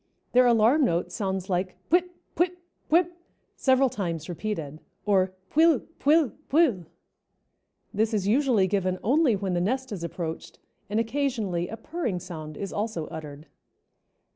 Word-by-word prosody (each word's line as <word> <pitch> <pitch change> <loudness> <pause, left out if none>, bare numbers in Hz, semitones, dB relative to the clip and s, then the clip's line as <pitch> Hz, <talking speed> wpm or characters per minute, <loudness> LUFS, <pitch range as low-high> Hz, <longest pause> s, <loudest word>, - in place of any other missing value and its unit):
Their 250 0 +5
alarm 240 +6 +4
note 175 -5 0
sounds 190 -1 -2
like 185 0 -1 0.2
"puip 360 +1 +4 0.3
puip 355 +1 +1 0.3
puip," 345 +2 +4 0.4
several 265 0 +3
times 170 -9 -3
repeated, 165 -5 -4 0.2
or 190 -2 +3 0.2
"puill 320 -3 +5 0.2
puill 300 -1 +4 0.2
puill;" 270 - +3 1.1
this 220 +2 +1
is 205 -3 0
usually 240 -3 +3
given 185 -1 0
only 265 +1 +3
when 195 -2 -2
the 175 - +1
nest 260 +6 -1
is 185 -5 -5
approached, 170 -1 -5 0.3
and 210 +2 +1
occasionally 225 -8 -1
a 225 - -7
purring 235 - -3
sound 155 -4 -8
is 195 - -5
also 205 -7 -2
uttered. 150 -1 -8
210 Hz, 140 wpm, -26 LUFS, 180-265 Hz, 1.1 s, Their